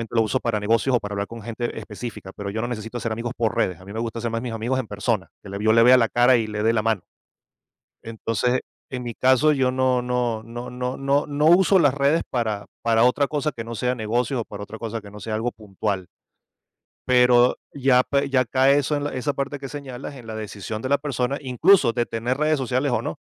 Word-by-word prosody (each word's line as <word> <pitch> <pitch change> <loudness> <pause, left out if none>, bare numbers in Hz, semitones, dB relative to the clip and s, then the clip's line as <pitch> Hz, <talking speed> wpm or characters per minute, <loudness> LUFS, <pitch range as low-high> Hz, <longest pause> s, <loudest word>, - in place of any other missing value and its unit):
lo 115 - +5
uso 130 +4 0
para 115 -4 -1
negocios 115 +5 +2
o 120 - +3
para 100 0 -6
hablar 100 0 -2
con 115 0 -9
gente 115 +2 -4
específica, 105 -3 -8
pero 100 -1 -5
yo 110 +2 -3
no 120 - -2
necesito 115 0 -5
hacer 115 -1 -3
amigos 115 +2 -3
por 115 -3 0
redes. 90 -3 0
A 95 - -14
mí 100 - -9
me 110 - -4
gusta 115 0 -3
ser 115 - -2
más 115 0 -2
mis 120 -2 -4
amigos 120 +4 -1
en 120 - -4
persona 100 0 -2
que 100 - -10
le 100 +1 -5
yo 110 - +4
les 115 0 +6
vea 125 +1 +8
la 115 -2 +2
cara 120 +1 +5
y 110 -1 -1
les 105 0 -3
dé 115 +1 +3
la 110 - +2
mano. 110 -4 0 1.0
Entonces, 115 +2 -1 0.3
en 125 -1 -5
mi 120 -1 -5
caso, 130 +4 +4
yo 130 -3 +2
no 130 -1 +2
no 120 -3 -1
no 120 +2 -7
no 125 +1 -4
no 140 +1 +1
no 145 +1 0
uso 190 +3 +6
las 145 -6 +4
redes 145 +3 +2
para 110 -5 -2 0.2
para 115 -1 +3
otra 125 +3 +3
cosa 150 +1 -1
que 115 - -7
no 115 +1 -6
sea 125 +3 0
negocios, 120 +3 -1
o - - -6
para 100 -1 -8
otra 110 +2 -9
cosa 115 0 -5
que 100 -1 -12
no 105 - -10
sea 110 +1 -5
algo 115 +3 -1
puntual. 100 -3 -4 1.0
Pero 125 -1 +5 0.2
ya 130 -2 +4
p 140 +1 0
ya 130 -2 +3
cae 135 +4 +4
eso 145 +1 0
en 145 - -2
la 145 - -3
esa 135 +3 -1
parte 140 0 -3
que 135 - -7
señalas 140 -1 -7
en 125 -3 -11
la 110 -1 -6
decisión 110 0 -6
de 130 - -3
la 140 - +4
persona, 140 -1 -2
incluso, 135 +1 +4
de 120 0 0
tener 120 +4 -2
redes 155 0 +2
sociales 130 +1 0
o 120 - +1
no. - - -5
120 Hz, 245 wpm, -23 LUFS, 110-130 Hz, 1.0 s, vea